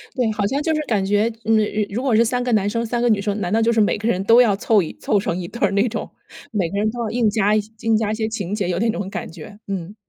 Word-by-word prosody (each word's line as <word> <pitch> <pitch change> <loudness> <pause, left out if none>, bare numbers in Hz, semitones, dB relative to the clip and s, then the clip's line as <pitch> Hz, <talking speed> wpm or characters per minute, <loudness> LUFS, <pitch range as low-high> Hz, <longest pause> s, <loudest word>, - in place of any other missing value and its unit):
对， 245 -5 +1
好 210 -1 -1
像 275 +7 -1
就 320 +1 0
是 305 - 0
感 205 -4 0
觉， 205 +3 +1
嗯， 225 0 +3 0.3
如 200 - -8
如 250 - -2
果 260 -5 +2
是 225 - +5
3 245 +2 -1
个 245 - -1
男 205 -2 +2
生 230 +2 -2
3 235 +1 -2
个 240 - +2
女 215 -3 +3
生， 205 0 -2
难 180 -2 -2
道 225 +2 +2
就 230 +1 +3
是 225 - +1
每 210 - +2
个 210 +2 -3
人 190 -5 0
都 230 +4 +6
要 220 -5 +3
凑 210 +1 +2
一 165 - -5
凑 205 - +1
成 180 -3 -2
一 180 -2 -5
对 235 - -10
儿 200 - +3
那 200 +4 +2
种， 220 - -5 0.4
每 195 -6 -1
个 200 - -4
人 210 +1 +1
都 240 - -8
要 225 - -2
硬 230 0 +1
加 210 0 +2
硬 220 +1 -1
加 215 -1 -1
一 - - -1
些 220 0 -2
情 205 -4 -4
节， 195 -4 -2
有 175 -1 -1
那 230 +2 +1
种 205 -3 -3
感 195 - -5
觉， 175 +5 -11
嗯。 195 0 -5
215 Hz, 325 characters per minute, -21 LUFS, 200-230 Hz, 0.4 s, 都